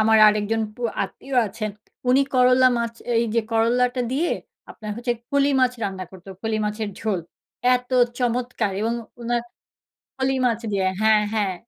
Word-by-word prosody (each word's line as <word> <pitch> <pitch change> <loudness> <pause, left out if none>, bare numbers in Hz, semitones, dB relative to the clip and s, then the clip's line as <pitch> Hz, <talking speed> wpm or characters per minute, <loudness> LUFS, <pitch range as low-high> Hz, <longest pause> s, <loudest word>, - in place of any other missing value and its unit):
আমার 220 0 +5
আরেকজন 210 +1 +1
পু 245 - -10 0.2
আত্মীয় 270 -1 -5
আছেন, 215 +1 -4 0.4
উনি 260 +2 +5
করল্লা 255 0 +6
মাছ, 235 0 -2 0.3
এইযে 230 0 +1
করল্লাটা 245 +3 +2
দিয়ে 315 +6 +1 0.4
আপনার 215 -1 -8
হচ্ছে 240 0 -1 0.2
ফলি 280 0 +3
মাছ 250 -1 +3
রান্না 190 -2 -3
করত, 190 -1 -14 0.2
ফলি 220 -1 0
মাছের 210 0 -2
ঝোল। 210 -5 -1 0.5
এত 250 0 -3 0.3
চমৎকার! 240 -4 -1
এবং 230 +2 0 0.3
উনার 235 0 -1 0.7
ফলি 265 0 0
মাছ 230 -2 0
দিয়ে 190 -1 +1
হ্যাঁ 215 -1 +5
হ্যাঁ, 205 -4 0
230 Hz, 150 wpm, -23 LUFS, 215-250 Hz, 0.7 s, করল্লা